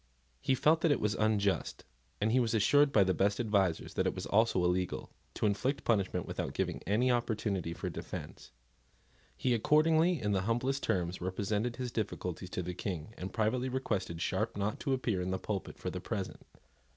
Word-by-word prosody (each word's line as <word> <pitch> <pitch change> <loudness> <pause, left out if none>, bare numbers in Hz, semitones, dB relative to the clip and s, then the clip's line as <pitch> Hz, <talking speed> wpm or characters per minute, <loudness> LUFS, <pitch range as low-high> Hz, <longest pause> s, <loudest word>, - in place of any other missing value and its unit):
He 130 - +2
felt 160 +5 +3
that 165 - +3
it 145 - +3
was 105 0 +1
unjust, 105 -2 0 0.3
and 110 +2 +1
he 130 - +4
was 115 -2 +1
assured 145 +7 +5
by 105 - +5
the 95 0 +2
best 100 +2 +1
advisers 100 -7 +1
that - - +1
it - - -1
was - - -4
also 110 -3 +3
illegal, 90 0 -1 0.2
to - - -1
inflict 125 +7 0
punishment 95 -5 +1
without - - -4
giving - - -1
any 120 +6 +3
opportunity 110 -7 -1
for 85 - -5
defence. - - -7 0.9
He 125 - +1
accordingly, 160 +7 +4
in 105 -3 -1
the 95 -2 +2
humblest 130 +4 0
terms, 90 -1 -1
represented 105 +5 -1
his 125 -1 -4
difficulties 90 -5 -3
to 90 - -3
the 90 +1 -4
King, 90 +1 -5
and 95 +1 -6
privately 120 +4 0
requested 105 -10 -2
Sharp 105 +3 -1
not 100 +1 -1
to 135 - 0
appear 115 -8 0
in 90 - -2
the 95 - 0
pulpit 100 0 -4
for - - -4
the - - -5
present. - - -4
105 Hz, 190 wpm, -32 LUFS, 95-125 Hz, 0.9 s, assured